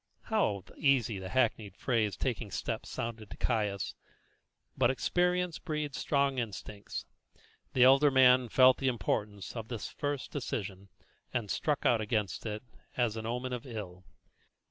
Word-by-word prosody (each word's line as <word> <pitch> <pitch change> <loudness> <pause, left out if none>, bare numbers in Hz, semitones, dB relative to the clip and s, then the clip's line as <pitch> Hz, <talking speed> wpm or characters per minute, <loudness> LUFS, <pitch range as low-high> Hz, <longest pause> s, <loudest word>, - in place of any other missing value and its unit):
How 110 - 0
easy 125 -8 +2
the 95 0 -6
hackneyed 110 -5 +1
phrase 110 -5 0
"taking 120 -4 -2
steps" - - -3
sounded 115 -3 -5
to - - -9
Caius! 105 -5 0 0.8
but - - +3
experience 180 +5 +1
breeds 150 -5 -3
strong 140 -2 +1
instincts. 105 -2 -5 0.7
The 125 - +5
elder 135 +3 +7
man 130 -2 +5
felt 130 +2 +6
the 135 - 0
importance 105 -3 -2
of 115 -2 -5
this 115 -3 -5
first 145 -2 -3
decision, 100 -8 -4 0.4
and 115 -5 -2
struck 150 -3 0
out 115 -2 +4
against 105 -1 -1
it 110 +2 -4 0.3
as 120 -3 +1
an 110 0 -4
omen 125 +2 -2
of 125 +2 -5
ill. 95 -6 -7
120 Hz, 145 wpm, -31 LUFS, 105-135 Hz, 0.8 s, elder